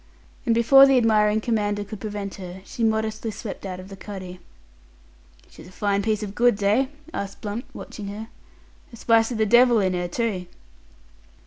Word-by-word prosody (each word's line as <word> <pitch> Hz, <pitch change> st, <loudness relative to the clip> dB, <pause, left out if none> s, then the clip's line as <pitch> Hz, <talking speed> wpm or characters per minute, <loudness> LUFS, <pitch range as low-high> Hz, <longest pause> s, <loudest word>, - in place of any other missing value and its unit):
And 230 Hz, -, +3 dB
before 270 Hz, +4 st, +7 dB
the 270 Hz, -1 st, +4 dB
admiring 215 Hz, -2 st, +3 dB
commander 205 Hz, -3 st, -1 dB
could 210 Hz, 0 st, -9 dB
prevent 205 Hz, -2 st, -5 dB
her, 180 Hz, +1 st, -8 dB
she 235 Hz, -, -5 dB
modestly 220 Hz, 0 st, 0 dB
swept 210 Hz, -2 st, -7 dB
out 185 Hz, -1 st, -6 dB
of 185 Hz, +1 st, -11 dB
the 195 Hz, -, -9 dB
cuddy. 185 Hz, -2 st, -8 dB, 1.1 s
"She's -, -, -14 dB
a -, -, -14 dB
fine 200 Hz, +1 st, 0 dB
piece 215 Hz, 0 st, -1 dB
of 200 Hz, -1 st, -6 dB
goods, 240 Hz, -3 st, +2 dB
eh?" 215 Hz, +7 st, +3 dB, 0.3 s
asked 200 Hz, 0 st, -5 dB
Blunt, 215 Hz, +5 st, -4 dB
watching 205 Hz, -2 st, -8 dB
her. 215 Hz, +3 st, -7 dB, 0.6 s
"A -, -, -11 dB
spice 225 Hz, 0 st, +2 dB
o' -, -, -2 dB
the 220 Hz, 0 st, +1 dB
devil 240 Hz, +1 st, +5 dB
in 190 Hz, -2 st, +1 dB
her, 175 Hz, 0 st, -2 dB
too." 190 Hz, -2 st, -2 dB
210 Hz, 180 wpm, -24 LUFS, 200-225 Hz, 1.1 s, before